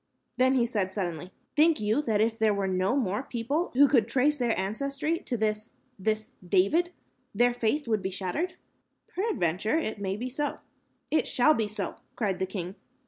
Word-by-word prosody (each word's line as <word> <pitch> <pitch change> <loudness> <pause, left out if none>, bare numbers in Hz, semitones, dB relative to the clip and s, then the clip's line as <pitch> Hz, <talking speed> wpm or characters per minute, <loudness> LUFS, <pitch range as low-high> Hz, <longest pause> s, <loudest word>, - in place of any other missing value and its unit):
Then 260 +1 +4
he 245 -2 +3
said 200 -5 -2
suddenly, 175 -3 -3 0.2
"Think 315 -1 +4
you 215 +6 +1
that 220 -7 +1
if 225 +1 +1
there 215 -2 +3
were 200 -1 -1
no 185 +5 +1
more 210 -5 0
people 275 +7 -2
who 285 +2 +7
could 240 -5 +3
trace 270 +5 +2
their 235 -4 +1
ancestry 275 - -1
to 245 - -3
this 215 0 -2 0.3
this 215 +2 -1
David, 200 - +2 0.4
their 245 +3 +4
faith 245 +4 0
would 215 -3 +1
be 190 - -2
shattered?" 195 - -2 0.5
"Peradventure, 215 - 0
it 220 -10 -3
may 195 0 -2
be 245 +4 -3
so." 290 +3 -2 0.5
"It 310 - +2
shall 280 +5 +4
be 225 -6 0
so," 215 - -4 0.2
cried 200 -5 -1
the 190 - 0
king. 185 -1 -5
225 Hz, 180 wpm, -28 LUFS, 195-275 Hz, 0.5 s, who